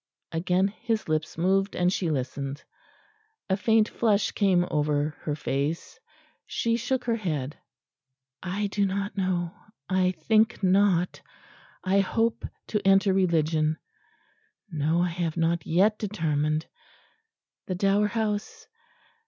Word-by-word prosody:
Again 180 +3 +1
his 225 +1 -3
lips 155 0 -1
moved 195 +3 +1
and 180 +1 +2
she 175 -4 -1
listened.... 140 0 -3 0.9
A - - +4
faint 220 +2 +3
flush 215 -4 +1
came 185 -4 +2
over 150 0 0
her 150 - -1
face. 150 - -3 0.5
She 230 0 0
shook 250 +2 -1
her 230 -1 0
head. 150 - -3 0.9
"I 190 +3 -2
do 200 0 0
not 200 +1 -3
know; 180 -3 -1 0.3
I 185 0 +2
think 220 +6 +2
not. 185 -2 +3 0.6
I 190 +1 +3
hope 225 +4 0 0.2
to 210 - 0
enter 195 0 +4
Religion.... 160 -4 +2 0.9
No, 160 +2 +1
I 180 - +1
have 170 -1 -3
not 165 0 0
yet 205 +6 +3
determined.... 155 -6 -1 1.0
The 185 - -2
Dower 200 +2 +2
House?... 220 - -3
185 Hz, 120 wpm, -27 LUFS, 160-205 Hz, 1.0 s, A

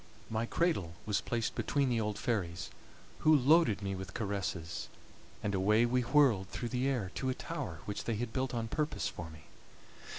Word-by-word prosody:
My 115 +1 0
cradle 115 - 0
was 105 -2 +1
placed 115 -2 -1
between 140 -2 +1
the 120 -3 +1
old 105 -1 -2
fairies, 95 -9 -2 0.5
who 155 0 +6
loaded 135 - +4
me 95 0 -1
with 95 0 -6
caresses, 95 -6 -3 0.5
and 105 - 0
away 105 +4 +4
we 125 +1 +2
whirled 125 -7 +4
through 120 - -4
the 125 +2 0
air 120 -9 -1
to 130 - -2
a 130 - 0
tower 135 - -5
which 105 - -4
they 115 - 0
had 110 +1 -3
built 130 -1 0
on 115 -1 -1
purpose 150 +6 -1
for 85 -1 -6
me. 80 -2 -13
115 Hz, 185 wpm, -33 LUFS, 95-130 Hz, 0.5 s, who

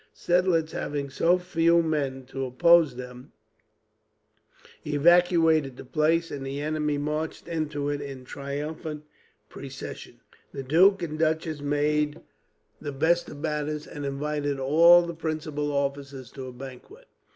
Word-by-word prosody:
Seidlitz, 175 -3 +1
having 140 -1 -4
so 170 +6 +3
few 170 -1 +2
men 140 -5 -2
to 135 +1 -5
oppose 155 +2 +4
them, 125 0 -10 1.5
evacuated 160 -2 +3
the - - -10
place, 160 +4 +1
and 140 -2 -5
the 135 +1 -4
enemy 150 0 -1
marched 150 +3 -3
into 150 -4 -3
it 145 0 -2
in 135 -2 -8
triumphant 150 +3 -5 0.4
procession. - - -9 0.3
The 135 - -5
duke 180 +7 +4
and 155 -2 -4
duchess 160 -1 0
made 150 +1 0 0.6
the 145 - -4
best 160 +5 +1
of - - -9
matters, 150 -1 -2
and 145 - -8
invited 145 0 -2
all 165 +6 +6
the 170 - -5
principal 155 -2 -3
officers 140 -2 -3
to 135 -1 -8
a - - -7
banquet. 135 - -11
150 Hz, 130 wpm, -26 LUFS, 140-165 Hz, 1.5 s, all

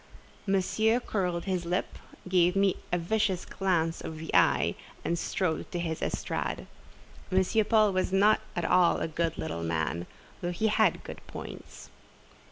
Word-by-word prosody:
Monsieur 215 +4 +2
curled 180 -7 -2
his 185 -2 -1
lip, 175 +2 -2 0.3
gave 180 0 +3
me 195 -1 +3 0.2
a 175 - +2
vicious 190 +1 0
glance 170 -4 0
of 160 - -6
the 160 +1 -7
eye, - - +4 0.3
and 170 0 0
strode 175 -4 -2
to - - -3
his 165 -2 -3
estrade. - - -2 0.7
M. 190 +4 +3
Paul 215 -2 +4
was 185 0 0
not 205 +3 +4
at 175 - -1
all 180 -1 +4
a - - -2
good 165 0 -1
little 120 - -4
man, 85 +1 -2 0.3
though 175 - -1
he 220 +5 +1
had 210 - +2
good - - -8
points. - - -9
180 Hz, 155 wpm, -29 LUFS, 165-195 Hz, 0.7 s, eye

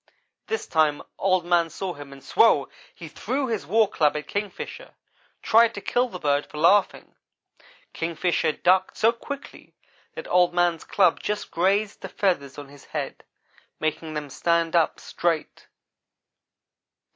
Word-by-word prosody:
This 445 0 -2
time 155 -2 +1 0.2
Old 185 -2 +2
man 175 -1 +2
saw 180 +3 -5
him 145 -2 -11
and 135 -1 -13
SWOW! 145 -3 +3 0.3
he 165 - -9
threw 255 - -3
his 225 -5 -3
war 220 +1 +4
club 150 -6 +1
at 150 -1 -6
Kingfisher; 205 - -6 0.5
tried 230 +1 +4
to - - -4
kill 245 +4 0
the 185 - -7
bird 145 -3 0
for 150 - -11
laughing. 185 +6 +2 0.8
Kingfisher 165 0 0
ducked 185 +3 +2
so 225 - +4
quickly 280 +4 -9 0.4
that - - -7
Old 180 -1 +3
man's 175 -2 +1
club 185 -4 +3
just 210 0 -4
grazed 200 +4 0
the - - -7
feathers 145 -9 -1
on 145 -1 -9
his 145 0 -16
head, - - -5 0.6
making 155 0 -3
them 145 -2 -5
stand 170 +1 0
up 165 -2 +2
straight. 165 -3 -3
175 Hz, 145 wpm, -24 LUFS, 155-205 Hz, 0.8 s, war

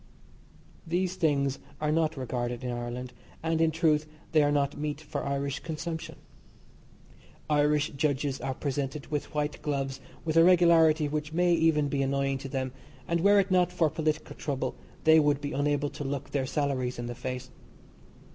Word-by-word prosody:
These 180 +2 0
things 140 -6 +1 0.2
are 150 0 0
not 160 -1 +1
regarded 125 -1 -3
in 125 - -2
Ireland, 120 +1 -5 0.3
and, 165 0 +1
in 165 - +4
truth, 155 -2 +2 0.2
they 155 - +5
are 145 0 +3
not 145 -1 +1
meat 150 0 -3
for 160 - -5
Irish 140 -1 -2
consumption. 160 0 -5 1.4
Irish 150 0 +3
judges 140 -1 -1
are 130 - -2
presented 140 +1 -3
with 150 -2 -2
white 150 0 -1
gloves 135 -2 -2 0.2
with 160 0 0
a 165 - +8
regularity 165 -3 +5
which 150 +1 -3
may 175 +1 +3
even 160 -3 +3
be 140 -1 -1
annoying 135 0 0
to 135 0 -7
them, 130 -1 -2 0.4
and 170 0 +1
were 200 +2 +6
it 195 0 +1
not 180 -1 +3
for 165 -4 +2
political 155 -1 -2
trouble 135 -3 -2 0.3
they 160 0 +7
would 145 -2 +3
be 145 0 -4
unable 145 0 0
to - - -6
look 140 0 -4
their 135 -2 0
salaries 135 -3 -1
in 120 - -4
the 120 - -4
face. 125 +1 -5
145 Hz, 170 wpm, -29 LUFS, 135-160 Hz, 1.4 s, a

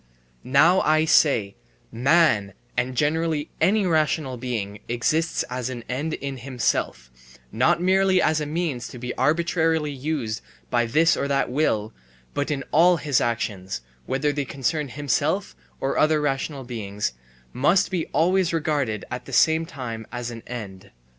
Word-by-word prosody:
Now 160 +8 +4
I 155 +1 +3
say: 120 -11 +3 0.4
man 120 - +3 0.2
and 125 +1 -1
generally 155 +1 0
any 205 +1 +3
rational 155 -5 +1
being 115 -5 -4
exists 155 +8 0
as 125 0 -3
an 120 -2 -6
end 145 +6 -2
in 140 -1 -5
himself, 120 - -2 0.4
not - - +2
merely 190 +1 +3
as 155 -3 +2
a 150 - -3
means 155 -5 -2
to - - -10
be 125 +1 -4
arbitrarily 160 +1 +1
used 135 -6 -3 0.3
by 120 -1 +2
this 165 +7 +4
or 140 - -1
that 140 -3 0
will, 115 -7 0 0.4
but 145 +1 -1
in 140 -3 -2
all 175 +3 +5
his 145 -5 +1
actions, 100 - -2 0.3
whether 145 +3 +1
they 145 0 -2
concern 145 +3 -2
himself 130 - -1 0.2
or 135 - -1
other 155 0 +4
rational 140 -1 -2
beings, 105 - -4 0.4
must 175 +10 +2
be 175 -3 -1
always 180 +4 +2
regarded 145 - -1
at 125 0 -5
the - - -10
same 160 0 +3
time 115 -8 -6
as 120 0 -4
an 115 -1 -8
end. 100 -6 -7
140 Hz, 150 wpm, -24 LUFS, 120-160 Hz, 0.4 s, all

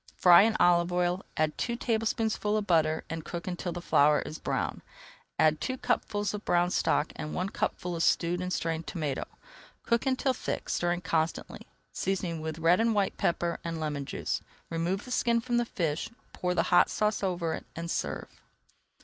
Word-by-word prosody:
Fry 175 0 +8
in 220 +2 +3
olive 175 0 +4
oil, 180 +1 0
add 155 -1 +1
two 235 - -1
tablespoonfuls 220 -2 0
of 210 -1 -2
flour, 160 -2 +2
and 165 -1 -5
cook 170 +1 -6
until 175 0 -3
the 175 0 -6
flour 150 -1 +4
is 155 - -7
brown. - - -2 0.6
Add 155 -1 +3
two 260 0 -2
cupfuls 210 -5 -1
of 210 0 -5
brown 175 0 +2
stock 150 - +1
and 150 - -5
one 185 +2 -1
cupful 180 -2 -2
of 165 - -2
stewed 175 +1 +2
and 180 0 -3
strained 165 -2 -2
tomato. 150 -7 -2 0.6
Cook 235 +3 +1
until 265 0 +1
thick, - - -4
stirring 175 0 0
constantly, 165 -3 -2 0.3
seasoning 180 -4 -2
with 160 0 -4
red 165 +3 +4
and 225 -1 +2
white 200 -2 +1
pepper 170 0 0
and 165 -1 -4
lemon 150 -3 -3
juice. - - -3 0.3
Remove 170 +4 -1
the 250 - -9
skin 235 -1 +2
from 240 0 -1
the 240 - +2
fish, 165 -8 -2 0.2
pour 180 -1 -1
the 165 - +3
hot 175 - +6
sauce 210 0 0
over 175 -4 -1
it, - - -7
and 170 +1 -4
serve. - - -4
175 Hz, 185 wpm, -29 LUFS, 165-210 Hz, 0.6 s, Fry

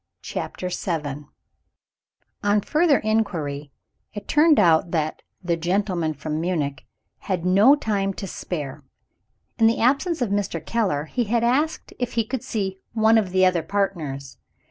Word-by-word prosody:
CHAPTER 180 - -4
VII 150 -5 -3 1.1
On 205 0 +3
further 305 - +3
inquiry, 160 -10 -1 0.4
it 205 - -7
turned 305 -1 +5
out 170 -3 +4
that 155 -2 -2 0.2
"the 170 -1 +1
gentleman 175 -2 -1
from 155 +2 -3
Munich" 150 -6 -2 0.3
had 180 -3 -3
no 200 +10 +6
time 205 -8 -1
to - - -5
spare. 150 -6 -5 0.8
In 225 - +6
the 230 - +2
absence 285 +8 +2
of 240 -6 -1
Mr. 195 -6 -2
Keller, 190 -11 0
he 240 +9 -2
had 230 +2 +1
asked 285 +7 0
if 245 -1 -2
he 230 -2 +1
could 255 +2 -4
see 195 -6 -3
"one 220 0 +4
of 200 -4 -2
the 185 +1 +3
other 180 -2 +2
partners." 160 -7 -3
190 Hz, 145 wpm, -23 LUFS, 160-225 Hz, 1.1 s, no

